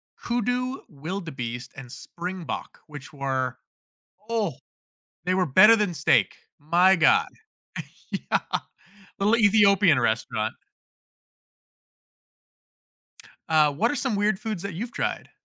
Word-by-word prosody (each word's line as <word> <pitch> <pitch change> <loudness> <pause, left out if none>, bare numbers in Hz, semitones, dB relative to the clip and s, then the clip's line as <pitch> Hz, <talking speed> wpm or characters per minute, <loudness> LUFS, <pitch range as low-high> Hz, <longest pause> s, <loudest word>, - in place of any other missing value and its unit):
hoodoo, 245 +2 -2
wildebeest, 140 -7 -6
and 130 -3 -10
springbok, 180 +3 -7
which 145 -1 -11
were, 130 -2 -2 0.7
oh, 215 - -1 0.7
they 180 - +1
were 185 -1 +2
better 200 +10 +7
than 210 -5 -1
steak, - - +2 0.2
my 175 +5 +4
god. 165 - +4 0.8
Yeah. - - -1 0.8
The 200 - 0
li 230 +2 +3
Ethiopian 200 -7 +5
restaurant. 110 -1 -1 3.0
Uh, 155 -2 +4
what 220 +12 0
are 290 - -3
some 255 -7 -1
weird 205 -1 +1
foods 215 -6 -5
that 200 -3 -5
you've 230 +8 -5
tried? - - -3
180 Hz, 110 wpm, -25 LUFS, 145-210 Hz, 3.0 s, better